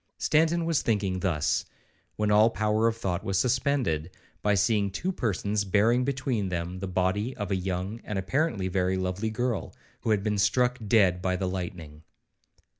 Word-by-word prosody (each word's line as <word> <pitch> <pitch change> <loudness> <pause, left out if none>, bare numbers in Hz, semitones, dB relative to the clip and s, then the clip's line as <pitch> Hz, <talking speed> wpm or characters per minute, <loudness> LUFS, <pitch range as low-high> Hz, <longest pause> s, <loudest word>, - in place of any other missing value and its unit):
Stanton 165 +2 +2
was 165 -3 +1
thinking 100 -4 0
thus, 85 -6 0 0.5
when 105 -1 0
all 105 +2 +6
power 110 0 +1
of 115 0 0
thought 95 -4 -2
was 95 -1 -1
suspended, 125 - +1 0.3
by 105 0 +2
seeing 100 +1 +2
two 160 - -2
persons 105 - -1
bearing 110 +6 +3
between 130 -7 -1
them 90 +1 -3
the 95 - -4
body 95 +7 -1
of 105 -1 -4
a - - +2
young, 95 +4 -3
and 105 - -4
apparently 105 - 0
very 95 0 0
lovely 95 +4 -2
girl, 120 0 -2 0.2
who - - -4
had 105 -2 +2
been 105 -1 0
struck 125 +4 +2
dead 95 -5 +4
by 90 0 0
the 95 0 -2
lightning. 85 -5 -6
100 Hz, 170 wpm, -27 LUFS, 95-115 Hz, 0.5 s, all